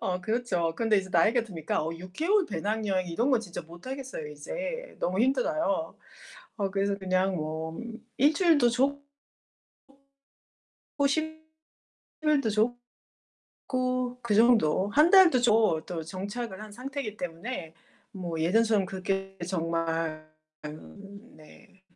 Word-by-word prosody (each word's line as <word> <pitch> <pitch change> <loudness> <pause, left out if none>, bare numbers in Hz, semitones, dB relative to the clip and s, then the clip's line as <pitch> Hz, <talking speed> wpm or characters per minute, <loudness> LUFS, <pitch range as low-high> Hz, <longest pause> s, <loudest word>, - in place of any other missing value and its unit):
어, 180 -1 -1
그렇죠. 185 -6 0
그런데 225 -2 +2
이제 190 0 -5
나이가 235 +2 +4
드니까 170 -9 -3
어 160 - -2
6개월 320 - 0
배낭여행 195 0 -1
이런 235 +11 0
거 255 - +4
진짜 180 -6 -6
못 170 +5 -14
하겠어요, 265 - -5
이제. - - -6
너무 185 +3 0
힘들어요. 255 - +1 0.6
어, 200 -2 0
그래서 200 0 0
그냥 185 0 +1
뭐 160 0 -4 0.4
1주일도 300 -2 +4
좋고 275 +4 +1 2.0
호심 315 +3 0 0.8
필드 295 -6 +2 1.0
좋고 255 -1 -2
그 220 -3 0
정도 215 -6 +4
1 300 +9 +5
달도 360 -9 +7
조 220 -8 +4
또 170 -3 -4
정착을 200 +4 -5
한 215 -1 -10
상태이기 255 -2 -5
때문에 175 0 -5 0.4
뭐 175 -4 -5
예전처럼 210 +4 +3
그게 195 +1 -3
정말 165 -2 -2 0.4
음 200 +8 -11
네. 195 +5 -18
205 Hz, 240 characters per minute, -28 LUFS, 175-255 Hz, 2.0 s, 달도